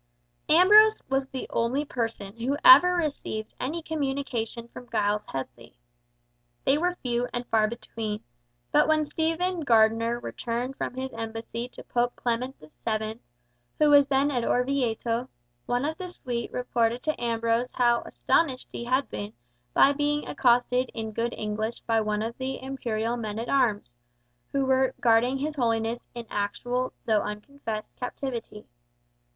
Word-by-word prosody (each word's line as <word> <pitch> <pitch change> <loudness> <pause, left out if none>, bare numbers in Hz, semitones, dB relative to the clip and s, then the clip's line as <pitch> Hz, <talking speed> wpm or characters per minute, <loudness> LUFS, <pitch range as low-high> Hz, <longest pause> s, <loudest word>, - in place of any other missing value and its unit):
Ambrose 420 +6 +7
was 270 0 +1
the 265 -1 -5
only 250 +6 0
person 225 -6 -4
who 250 +5 -1
ever 360 +8 +9
received 285 -9 -3
any 315 +6 -3
communication 270 -7 -3
from 245 +1 -12
Giles 210 +1 0
Headley. 125 -3 -7 0.9
They 270 - +4
were 355 +2 0
few 245 -1 0
and 245 0 -3
far 220 -1 +3
between, 215 -2 -5 0.5
but - - +4
when 310 -1 +3
Stephen 330 +4 -1
Gardiner 230 -3 +3
returned 240 +3 -4
from 250 - -4
his 260 0 -4
embassy 225 +1 -5
to - - -12
Pope 245 0 0
Clement 245 +3 -2 0.3
VII., 220 0 -2 0.6
who 300 -1 +4
was 285 -1 +7
then 280 +1 +2
at 245 -3 0
Orvieto, 245 -2 0 0.4
one 245 +3 0
of 315 +1 -3
the 365 -1 -5
suite 245 -8 -4
reported 240 -1 0
to 310 -5 -2
Ambrose 230 +1 0
how 240 -1 +3
astonished 270 -6 0
he 235 - -5
had 260 +3 +1
been 105 0 -6 0.4
by 280 - +5
being 295 +1 0
accosted 250 0 +2
in 220 -1 -4
good 230 +2 -2
English 215 +2 -3
by 225 -1 +1
one 210 0 -1
of 230 +1 -4
the 260 0 -3
imperial 240 -3 -2
men 215 -2 -4
at 230 +1 -4
arms, 220 - +1 0.6
who 275 -1 +1
were 265 0 +2
guarding 240 +3 +3
his 300 +2 -3
Holiness 230 -1 0
in 235 -1 -6
actual 245 +5 -1
though 215 -2 +3
unconfessed 215 0 -6
captivity. 245 -4 -5
245 Hz, 145 wpm, -27 LUFS, 225-270 Hz, 0.9 s, ever